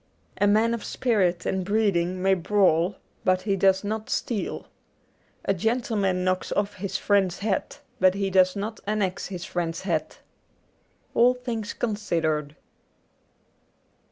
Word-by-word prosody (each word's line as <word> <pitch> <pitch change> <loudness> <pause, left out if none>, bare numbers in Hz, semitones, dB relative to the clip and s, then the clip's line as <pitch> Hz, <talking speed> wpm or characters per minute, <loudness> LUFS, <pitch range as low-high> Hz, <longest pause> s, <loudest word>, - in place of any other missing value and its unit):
A 205 - +4
man 220 +3 +3
of 235 - -4
spirit 190 -8 0
and 190 -1 -1
breeding 185 -3 +1
may 195 0 +4
brawl, 185 -1 +2 0.3
but 185 0 +2
he 200 -1 +1
does 190 0 +3
not 215 +1 -3
steal. 220 -5 -2 0.8
A 195 - +2
gentleman 205 -2 0
knocks 185 0 -1
off 205 0 -1
his 195 +1 -3
friend's 195 -3 +2
hat, 200 -2 -2 0.2
but 185 0 +4
he 195 -1 -1
does 185 0 +4
not 210 +2 -4
annex 205 -3 -1
his 180 -2 -6
friend's 165 -2 -3
hat. 160 -5 -2 0.5
' - - -40
All 245 +2 +5
Things 230 -3 -4
Considered.'' 165 -9 -1
195 Hz, 135 wpm, -25 LUFS, 180-215 Hz, 0.8 s, All